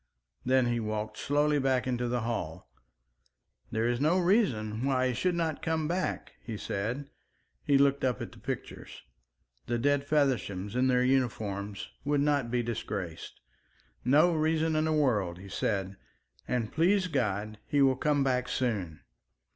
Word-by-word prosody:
Then 130 -1 +3
he 120 -1 0
walked 110 -1 -3
slowly 145 +1 +2
back 130 -2 +1
into 125 -1 -1
the 120 0 -1
hall. 110 -9 -4 1.0
"There 110 +1 0
is 120 +1 0
no 160 +5 +3
reason 130 - +1
why 130 -1 +2
he - - -1
should 175 +9 0
not 165 -3 -1
come 160 -1 0
back," 180 +3 -2
he 115 -3 -6
said. 120 +10 -3 0.5
He 140 - +4
looked 140 0 +3
up 130 -2 +1
at - - -6
the - - -15
pictures. - - -6 0.6
The 120 - 0
dead 140 +3 +1
Fevershams 120 -9 0
in 130 +1 +3
their 125 -1 +3
uniforms 105 -6 -1 0.2
would 145 0 +1
not 145 -4 +1
be 120 0 0
disgraced. 100 -7 -5 0.6
"No 155 +7 +5
reason 160 0 +1
in 155 0 +2
the 160 - +1
world," 110 - +1
he 100 +2 -11
said. 100 -1 -2 0.5
"And, 115 -3 -1
please 185 +5 +3
God, 110 - -2
he 145 -2 +3
will 135 -1 +4
come 145 +1 +1
back 125 -1 0
soon." 105 -12 -2
130 Hz, 155 wpm, -30 LUFS, 110-145 Hz, 1.0 s, No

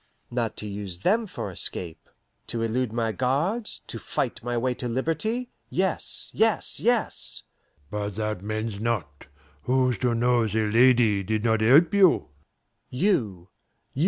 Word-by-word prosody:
"Not 120 -3 -2
to 105 - -5
use 100 -3 -5
them 220 - +2
for - - -5
escape. 85 -3 -3 0.4
To 115 -1 -1
elude 115 +1 -1
my 115 -1 0
guards, 145 - -1
to - - -7
fight - - -3
my 120 0 -2
way 125 +2 0
to 125 - -5
liberty 165 - -1 0.2
yes 190 -1 0
yes 220 0 +1
yes!" 240 0 0 0.5
"But 105 -1 -3
that 105 -3 -2
mends 110 0 -3
not. 100 -11 -3 0.4
Who's 130 -1 +2
to 125 -2 +1
know 120 -1 +2
the 110 +1 0
lady 115 -2 +4
did 110 +2 -2
not 110 -2 +2
help 145 - +6
you?" 195 - +4 0.6
"You. 115 - 0
115 Hz, 140 wpm, -26 LUFS, 105-135 Hz, 0.6 s, help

